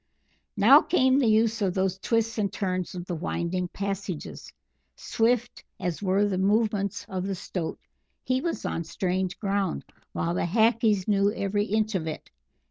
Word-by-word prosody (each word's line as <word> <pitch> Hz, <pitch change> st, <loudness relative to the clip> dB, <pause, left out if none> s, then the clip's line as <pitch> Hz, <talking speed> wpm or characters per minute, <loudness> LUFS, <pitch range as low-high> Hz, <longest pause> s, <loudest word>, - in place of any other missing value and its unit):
Now -, -, +8 dB
came 260 Hz, -5 st, +3 dB
the 255 Hz, -, +2 dB
use 220 Hz, +1 st, +2 dB
of 190 Hz, -3 st, 0 dB
those 190 Hz, 0 st, 0 dB
twists 230 Hz, +1 st, 0 dB
and 200 Hz, -2 st, 0 dB
turns 185 Hz, -3 st, -3 dB
of 175 Hz, -1 st, -5 dB
the 180 Hz, -, -4 dB
winding 175 Hz, +2 st, -2 dB
passages. 195 Hz, -2 st, -5 dB, 0.4 s
Swift 240 Hz, +1 st, 0 dB, 0.2 s
as 175 Hz, 0 st, -3 dB
were 195 Hz, +1 st, +2 dB
the 190 Hz, -2 st, -1 dB
movements 205 Hz, 0 st, +1 dB
of 185 Hz, 0 st, -3 dB
the 195 Hz, -, -2 dB
Stoat, 175 Hz, -2 st, -4 dB, 0.5 s
he 255 Hz, +1 st, 0 dB
was 340 Hz, -, -3 dB
on 165 Hz, -, -2 dB
strange 185 Hz, +2 st, -2 dB
ground, 200 Hz, -3 st, -1 dB, 0.3 s
while 170 Hz, +1 st, -1 dB
the 175 Hz, -, 0 dB
Hackees 220 Hz, 0 st, +2 dB
knew 200 Hz, -1 st, +3 dB
every 205 Hz, -1 st, -1 dB
inch 215 Hz, +1 st, 0 dB
of 170 Hz, -4 st, -2 dB
it. 155 Hz, -, -6 dB
200 Hz, 160 wpm, -26 LUFS, 185-220 Hz, 0.5 s, Now